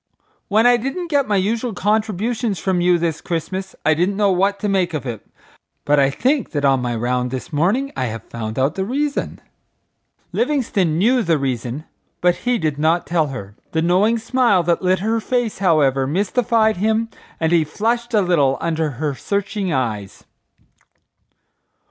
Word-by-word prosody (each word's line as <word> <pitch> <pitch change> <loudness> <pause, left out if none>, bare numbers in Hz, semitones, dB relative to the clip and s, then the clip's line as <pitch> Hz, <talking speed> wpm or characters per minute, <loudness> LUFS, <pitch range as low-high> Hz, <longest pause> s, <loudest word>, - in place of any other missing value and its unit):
When 215 +3 +3
I 245 0 +6
didn't 300 +9 -4
get 285 -2 +2
my 210 - +1
usual 220 +4 -1
contributions 215 +2 0
from 180 +1 0
you 175 0 +4
this 165 -2 -2
Christmas 185 +3 -4
I 155 - +5
didn't 180 +5 0
know 205 -2 +3
what 195 +2 +1
to 210 - 0
make 185 -4 +1
of 145 - -4
it, 115 -5 -6 0.6
but 145 0 +3
I 135 -1 +4
think 260 - 0
that 145 -2 0
on 135 -2 +3
my 120 -1 -2
round 125 +2 -1
this 130 +4 -6
morning 210 - +1
I 130 - -1
have 115 -2 -5
found 110 -1 -6
out 135 +3 +1
the 190 - -2
reason?" 280 +7 -2 0.9
Livingstone 225 - 0
knew 240 +7 +3
the 170 -6 +2
reason, 130 +1 -3 0.3
but 180 0 +3
he 245 -1 0
did 155 -7 -2
not 160 +3 +2
tell 165 -3 +1
her. 105 -7 -8 0.2
The 160 -1 +1
knowing 195 +7 +3
smile 235 -5 +2
that 170 0 +1
lit 185 0 +1
her 225 +2 0
face, 240 -2 -1
however, 140 -8 +2
mystified 220 - +1
him 220 +3 +1 0.3
and 160 0 +1
he 170 -2 +4
flushed 235 +8 -1
a 210 - +5
little 150 -8 +2
under 160 -2 -1
her 150 0 -1
searching 200 +4 -2
eyes. 110 -8 -3
180 Hz, 175 wpm, -20 LUFS, 150-220 Hz, 0.9 s, I